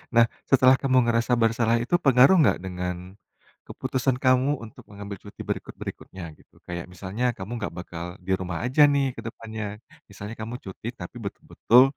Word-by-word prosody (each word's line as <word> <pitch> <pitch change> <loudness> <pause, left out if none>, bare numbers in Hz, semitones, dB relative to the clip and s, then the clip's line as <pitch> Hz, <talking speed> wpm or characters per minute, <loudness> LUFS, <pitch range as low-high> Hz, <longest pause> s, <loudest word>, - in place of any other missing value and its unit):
Nah 115 0 +8 0.2
setelah 130 -1 +6
kamu 130 -2 +3
ngerasa 120 +1 +2
bersalah 115 0 +3
itu 175 - +1
pengaruh 135 +3 +6
enggak 150 - +4
dengan 90 -1 -3 0.7
keputusan 130 -1 -1
kamu 130 +2 +4
untuk 110 - -11
mengambil 100 0 -7
cuti 100 - -10
berikut-berikutnya, 95 -2 -6 0.2
gitu. - - -30
Kayak 85 -1 -4
misalnya 100 +7 -3
kamu 95 +5 -7
enggak 100 - -4
bakal 85 -1 -6 0.2
di 95 - -2
rumah 90 -2 -3
aja 130 +4 +2
nih 140 -1 +2
ke - - -7
depannya, 110 -1 -6 0.5
misalnya 100 +2 -8
kamu 115 +3 -5
cuti 95 +4 -8
tapi 90 +7 -8
betul-betul 120 +4 +4
115 Hz, 160 wpm, -25 LUFS, 95-130 Hz, 0.7 s, Nah